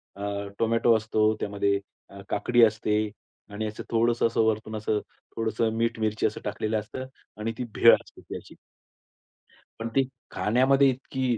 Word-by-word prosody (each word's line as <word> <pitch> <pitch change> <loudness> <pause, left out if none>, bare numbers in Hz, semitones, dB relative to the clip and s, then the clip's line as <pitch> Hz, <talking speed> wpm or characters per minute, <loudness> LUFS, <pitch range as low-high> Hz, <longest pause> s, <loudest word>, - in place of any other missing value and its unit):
अ, 100 0 -4
tomato 115 0 +4
असतो, 110 0 +2
त्यामध्ये 100 -1 0 0.3
अ, 100 - -12
काकडी 120 +4 +2
असते 110 -1 0 0.6
आणि 105 +1 -3
असं 105 - -6
थोडंसं 115 +1 +3
असं 115 - +1
वरतून 110 0 -1
असं 110 0 0 0.4
थोडंसं 115 0 0
मीठ 115 0 0
मिरची 110 0 0
असं 110 - -6
टाकलेलं 105 +1 -1
असतं 130 +5 -7 0.3
आणि 110 +2 -2
ती - - -2
भेळ - - +8
असते - - -13
ती - - -7
अशी. - - -13 1.2
पण 115 - -3
ती 135 -1 +3 0.2
खाण्यामध्ये 135 +5 +3
इतकी 130 -2 -1
110 Hz, 155 wpm, -26 LUFS, 105-115 Hz, 1.2 s, भेळ